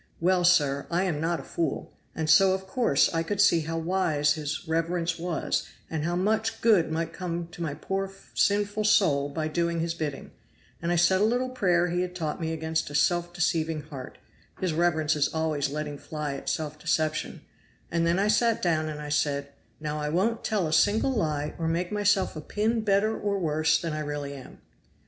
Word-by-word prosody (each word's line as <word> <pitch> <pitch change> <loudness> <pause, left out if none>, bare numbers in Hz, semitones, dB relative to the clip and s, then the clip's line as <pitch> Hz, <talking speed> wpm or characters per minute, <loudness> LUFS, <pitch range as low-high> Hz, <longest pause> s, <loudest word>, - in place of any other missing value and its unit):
Well, 180 +1 +2
sir, 145 -6 +3
I 175 +2 +1
am 165 -6 -1
not 165 +1 0
a - - -8
fool, 170 - -3 0.2
and 160 -1 -2
so 190 +4 +6
of 190 0 -7
course 190 - +2
I 165 - +1
could 195 +5 -3
see 200 -4 +5
how 165 +1 -3
wise 160 -4 +1
his 155 +2 -4
reverence 165 +1 -1
was, 170 -2 -1 0.2
and 160 -2 -2
how 175 +2 -1
much 220 +4 0
good 205 -9 +4
might 165 0 -2
come 175 -2 -4
to 170 - -10
my 150 -4 -2
poor 195 +5 -3 0.2
sinful 205 +1 +1
soul 145 -9 +3
by 155 +2 -2
doing 170 +1 -1
his 165 0 -1
bidding; 150 -4 -5 0.5
and 170 +1 -1
I - - +2
said 185 +3 +4
a - - +4
little 245 +4 +1
prayer 180 -8 +2
he 175 +1 0
had 180 0 -4
taught 160 -2 -3
me 160 0 -1
against 160 -1 -2
a 145 - -7
self 175 +3 +2
deceiving 160 -3 0
heart 140 -4 -9 0.4
his 185 -3 -1
reverence 160 -2 +2
is 145 -1 +1
always 155 -3 -1
letting 150 0 -4
fly 150 -2 -4
at - - -5
self 155 -1 -3
deception 155 0 -1 0.5
and 170 0 +1
then 170 +1 +2
I 200 +2 +2
sat 225 +2 +3
down 155 -3 0
and 150 -1 -6
I 150 0 -6
said, 140 -1 0 0.3
'Now 150 0 -3
I 150 0 -2
won't 210 +8 0
tell 205 -5 0
a 155 - -2
single 210 - +3
lie 150 - -1
or 165 - -1
make 175 +3 -1
myself 205 -3 +1
a 155 - -5
pin 220 +7 0
better 210 +1 +2
or 205 -1 -1
worse 155 -3 +2
than 165 -2 -3
I 155 - -3
really 145 -1 -4
am. 135 -2 -12
165 Hz, 205 wpm, -27 LUFS, 155-190 Hz, 0.5 s, so